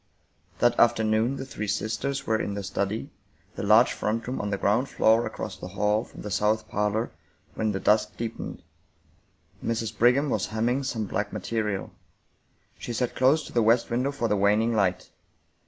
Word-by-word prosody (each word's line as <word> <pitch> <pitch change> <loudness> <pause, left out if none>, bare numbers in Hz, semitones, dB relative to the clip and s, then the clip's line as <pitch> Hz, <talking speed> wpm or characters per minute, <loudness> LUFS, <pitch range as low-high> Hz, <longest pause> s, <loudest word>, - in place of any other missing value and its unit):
That 120 0 +2
afternoon 110 +2 +3
the 135 - -5
three 105 -5 -5
sisters 120 +7 -2
were 110 0 +1
in 100 - -3
the 100 - -4
study, 100 +3 -3 0.4
the - - -6
large 110 +4 +5
front 115 +2 -2
room 125 - -2
on 105 - -3
the 100 - -1
ground 110 +8 +1
floor 115 +2 +3
across - - -6
the - - -7
hall 105 +3 +1
from - - -12
the 105 - -5
south 105 +2 +1
parlor, 105 +2 -1 0.4
when 110 -1 -1
the 95 - -2
dusk 105 0 +2
deepened. 115 -1 -5 1.0
Mrs. 115 -1 -2
Brigham 125 +5 +3
was 100 - 0
hemming 120 +5 0
some 120 -5 -2
black 105 +1 -2
material. 105 -4 -3 0.9
She 120 - -5
sat 125 +1 -1
close 140 +5 +3
to - - -11
the 120 - +3
west 115 +2 +3
window 125 +4 0
for 130 -5 -1
the 105 - +1
waning 105 +3 +3
light. 95 -4 0
110 Hz, 175 wpm, -26 LUFS, 105-120 Hz, 1.0 s, large